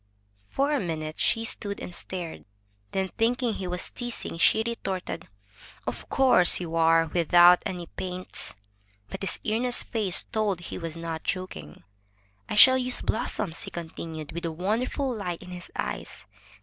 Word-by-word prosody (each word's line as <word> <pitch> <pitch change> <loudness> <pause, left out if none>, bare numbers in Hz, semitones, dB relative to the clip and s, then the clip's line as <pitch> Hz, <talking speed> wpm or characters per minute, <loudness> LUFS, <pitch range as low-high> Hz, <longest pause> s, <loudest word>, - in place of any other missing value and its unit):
For 280 +2 +1
a 290 - +2
minute 155 -4 -4
she 225 0 +2
stood 200 -2 -2
and 180 - -7
stared. 175 -2 -5 0.5
Then, 190 0 -1
thinking 240 +1 +2
he 190 -3 -4
was 180 0 -3
teasing, 240 -8 -5
she 220 - +5
retorted: 195 -6 -4 0.6
"Of - - -5
course 255 - +6
you 165 -2 -4
are, 165 0 +5
without 175 +1 +6
any 180 -2 -5
paints!*' 185 +2 -6 0.6
But - - -6
his 195 - -2
earnest 240 +3 +1
face 210 -6 +3
told 210 -5 -1
he - - -6
was 165 -1 -5
not 165 -1 -4
joking. 185 - -5 0.7
"I - - -2
shall 260 +5 +8
use 250 0 0
blossoms," 200 -5 -1
he - - -4
continued, 160 -2 -7
with 170 +1 -5
a 165 - -1
wonderful 225 - -1
light 180 -6 -4
in 180 - -11
his 180 -1 -8
eyes. - - -5
185 Hz, 155 wpm, -27 LUFS, 170-225 Hz, 0.7 s, shall